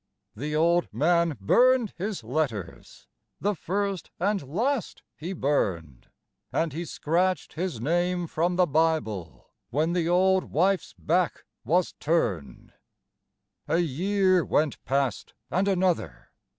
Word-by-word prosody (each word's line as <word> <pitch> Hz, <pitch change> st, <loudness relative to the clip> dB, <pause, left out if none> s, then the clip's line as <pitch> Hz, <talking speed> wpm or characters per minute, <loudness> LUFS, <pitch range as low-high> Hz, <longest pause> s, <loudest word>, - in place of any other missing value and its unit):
The 150 Hz, +7 st, -3 dB
old 170 Hz, +2 st, +2 dB
man 165 Hz, +5 st, +2 dB
burned 245 Hz, -, +3 dB
his 195 Hz, -, -4 dB
letters, 115 Hz, -, -4 dB, 0.3 s
the 205 Hz, +1 st, +1 dB
first 195 Hz, 0 st, -3 dB
and 200 Hz, +2 st, +1 dB
last 240 Hz, -, -1 dB
he 170 Hz, +4 st, -6 dB
burned, 95 Hz, -, -1 dB, 0.4 s
And 160 Hz, -3 st, 0 dB
he 170 Hz, +3 st, -4 dB
scratched 180 Hz, +4 st, 0 dB
his 170 Hz, -7 st, -3 dB
name 175 Hz, +6 st, 0 dB
from 170 Hz, +2 st, 0 dB
the 180 Hz, 0 st, +4 dB
Bible 155 Hz, -, -1 dB, 0.2 s
when 155 Hz, +7 st, 0 dB
the 170 Hz, -2 st, 0 dB
old 190 Hz, +1 st, +3 dB
wife's 185 Hz, +5 st, 0 dB
back 175 Hz, +1 st, 0 dB, 0.2 s
was 175 Hz, +2 st, +1 dB
turned. 110 Hz, -, -1 dB, 0.9 s
A 165 Hz, -, +2 dB
year 185 Hz, +3 st, +2 dB
went 150 Hz, -2 st, 0 dB
past 135 Hz, -5 st, -1 dB, 0.2 s
and 185 Hz, +3 st, +1 dB
another. 180 Hz, -, 0 dB
170 Hz, 120 wpm, -26 LUFS, 145-185 Hz, 0.9 s, the